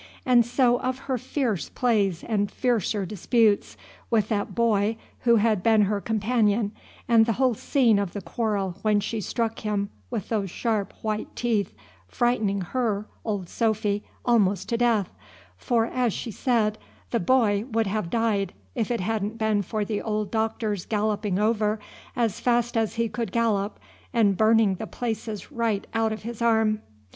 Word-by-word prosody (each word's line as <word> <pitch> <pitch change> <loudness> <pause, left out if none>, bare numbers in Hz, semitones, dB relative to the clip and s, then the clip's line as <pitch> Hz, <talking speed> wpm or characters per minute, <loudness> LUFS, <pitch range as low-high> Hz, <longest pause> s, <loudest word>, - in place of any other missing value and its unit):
And 245 -3 +5
so 245 +1 +2
of 255 0 -2
her 260 -2 -1
fierce 220 - -2
plays 205 -8 +1
and 205 -3 0
fiercer 220 -4 0
disputes 210 +2 +1 0.3
with 220 -3 +2
that 205 -3 -1
boy 225 -2 +2 0.3
who 235 -1 +6
had 215 -3 +2
been 220 +1 +4
her 200 0 0
companion, 215 -1 +1 0.4
and 230 -1 +5
the 230 - +2
whole 255 +1 +2
scene 230 -2 +2
of 200 -4 -2
the 205 - -4
quarrel 195 -1 -2
when 210 -1 +3
she 220 +2 -3
struck 225 +2 -2
him 205 -2 -2 0.2
with 200 - -4
those 205 -4 -1
sharp 215 +1 -1
white 215 -1 -3
teeth, 220 -5 0 0.3
frightening 215 - +1
her, 215 +1 -1 0.2
old 205 -5 -3
Sophy, 215 -1 0 0.2
almost 200 -6 +2
to 235 - +1
death; 230 -5 +1 0.4
for, 225 - +1
as 245 -2 0
she 230 - -5
said, 215 -2 +1 0.3
the - - +1
boy 215 -2 +2
would 225 -1 +1
have 195 -3 -2
died, 220 -3 0 0.2
if 230 -4 -1
it 235 -4 -1
hadn't 215 +2 -2
been 220 -2 +1
for 210 +2 -2
the 210 -1 -2
old 210 -2 -2
Doctor's 220 -3 -1
galloping 210 -2 0
over 215 0 +1 0.4
as 230 -2 0
fast 240 0 +1
as 225 -2 0
he 230 0 +1
could 230 -3 -4
gallop 215 -3 0 0.3
and 215 -5 +3
burning 220 -1 +4
the 220 - -5
places 220 0 -4
right 230 -6 -1
out 225 -1 +1
of 220 - -5
his 235 0 -6
arm. 220 -2 +2
220 Hz, 165 wpm, -25 LUFS, 205-235 Hz, 0.4 s, who